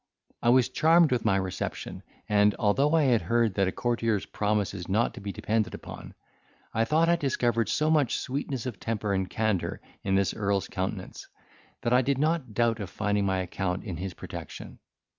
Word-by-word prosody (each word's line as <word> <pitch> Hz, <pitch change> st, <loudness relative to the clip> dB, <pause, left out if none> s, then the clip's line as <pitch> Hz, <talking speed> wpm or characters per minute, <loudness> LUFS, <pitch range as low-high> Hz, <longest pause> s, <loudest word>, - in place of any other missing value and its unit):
I 120 Hz, -, +2 dB
was 125 Hz, 0 st, +5 dB
charmed 165 Hz, 0 st, +4 dB
with 125 Hz, -2 st, 0 dB
my 95 Hz, -, +3 dB
reception, 95 Hz, -1 st, -3 dB, 0.3 s
and, 105 Hz, 0 st, +4 dB
although 135 Hz, +9 st, +2 dB
I 160 Hz, -, +4 dB
had 125 Hz, -5 st, +3 dB
heard 115 Hz, -3 st, +1 dB
that 95 Hz, -1 st, +1 dB
a -, -, 0 dB
courtier's 115 Hz, -3 st, 0 dB
promise 105 Hz, -1 st, -1 dB
is 90 Hz, -2 st, -7 dB
not 110 Hz, +5 st, +1 dB
to -, -, -9 dB
be 100 Hz, 0 st, -4 dB
depended 110 Hz, +3 st, -1 dB
upon, -, -, -10 dB, 0.6 s
I 115 Hz, +1 st, +2 dB
thought 160 Hz, +6 st, +3 dB
I 170 Hz, -, +5 dB
discovered 120 Hz, -6 st, 0 dB
so 155 Hz, +1 st, +1 dB
much 145 Hz, -6 st, +2 dB
sweetness 135 Hz, -2 st, -3 dB
of 120 Hz, -8 st, -5 dB
temper 105 Hz, -3 st, -2 dB
and 95 Hz, -1 st, -1 dB
candour 110 Hz, -4 st, -1 dB, 0.2 s
in 95 Hz, -1 st, +1 dB
this 100 Hz, -1 st, +2 dB
earl's 100 Hz, -2 st, 0 dB
countenance, 95 Hz, 0 st, -5 dB, 0.6 s
that 120 Hz, -, +1 dB
I 125 Hz, -, +6 dB
did 135 Hz, +1 st, 0 dB
not 150 Hz, -6 st, 0 dB
doubt 115 Hz, -1 st, +2 dB
of 100 Hz, -3 st, -5 dB
finding 105 Hz, 0 st, 0 dB
my 95 Hz, -1 st, +1 dB
account 90 Hz, +1 st, -3 dB
in 95 Hz, -7 st, -5 dB
his 95 Hz, +1 st, -5 dB
protection. -, -, -8 dB
110 Hz, 190 wpm, -28 LUFS, 100-125 Hz, 0.6 s, I